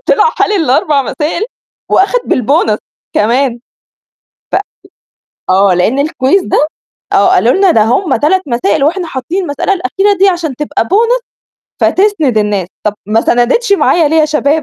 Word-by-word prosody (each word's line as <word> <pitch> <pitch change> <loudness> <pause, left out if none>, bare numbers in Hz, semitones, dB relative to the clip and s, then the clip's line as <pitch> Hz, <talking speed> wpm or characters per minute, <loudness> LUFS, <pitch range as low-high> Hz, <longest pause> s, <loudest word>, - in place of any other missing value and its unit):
طلع 440 +2 +3
حالل - - +1
ال4 305 -4 +1
مسائل 315 +8 -3 0.5
وأخَد 465 +6 +2
بالبونص 245 -3 +1 0.4
كمان. 240 +3 +1 0.9
ف - - +2 0.9
آه 190 0 +3
لأن 215 +10 0
الكويز 285 +4 +1
ده، 300 - +1 0.5
آه - - +3
قالوا - - +3
لنا 390 -2 +3
ده 220 - +3
هم 265 - +1
3 370 +6 +1
مسائل 235 0 0
واحنا 350 +3 -1
حاطين 320 +7 -4
المسألة 290 +4 -2
الأخيرة 390 +1 0
دي 390 +1 +4
عشان 335 -8 -2
تبقى 295 - -2
bonus 465 +6 +1 0.6
فتسند 350 - +1
الناس، 205 -3 -1 0.2
طَب 210 - 0
ما 220 +2 +1
سَنَدِتش 255 - +1
معايا 340 -5 +3
ليه 320 - 0
يا 315 - +4
شباب، 300 0 0
300 Hz, 150 wpm, -12 LUFS, 245-380 Hz, 0.9 s, دي